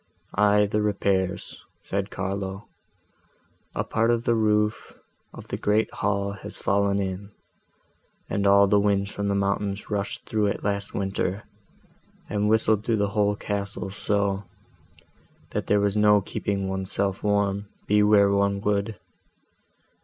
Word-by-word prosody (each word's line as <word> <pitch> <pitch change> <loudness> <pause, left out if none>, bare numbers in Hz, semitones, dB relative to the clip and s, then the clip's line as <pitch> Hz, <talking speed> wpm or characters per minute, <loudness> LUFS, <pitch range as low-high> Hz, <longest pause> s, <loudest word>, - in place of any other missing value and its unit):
"Aye, 105 0 +4
the 105 +1 0
repairs," 95 -3 -1 0.2
said 100 +1 -2
Carlo: 95 +1 -4 1.1
"a - - 0
part 115 +1 0
of 120 -1 +2
the 120 - +2
roof 105 -1 0 0.3
of - - -12
the - - -3
great 105 +2 +1
hall 100 0 -1
has 100 - -8
fallen 100 0 +1
in, 95 +1 -4 1.0
and 100 0 0
all 100 0 +6
the 100 +1 +3
winds 100 -1 +1
from 100 0 -3
the 100 - +1
mountains 100 +1 -1
rushed 100 -1 -3
through 105 -2 +1
it 100 - -3
last 100 0 -2
winter, 95 0 -2 0.8
and 105 +1 0
whistled 110 -1 +3
through 115 0 +1
the 100 -1 +1
whole 105 0 +1
castle 100 -2 -4
so, 100 0 -1 1.1
that - - -3
there 105 - +3
was 100 0 +1
no 105 -1 +5
keeping 100 0 -3
one's 95 0 -3
self 100 -1 -1
warm, 100 -1 0 0.2
be 105 0 +3
where 105 -1 +5
one 100 0 +1
would. 105 +1 -1
100 Hz, 145 wpm, -25 LUFS, 100-105 Hz, 1.1 s, all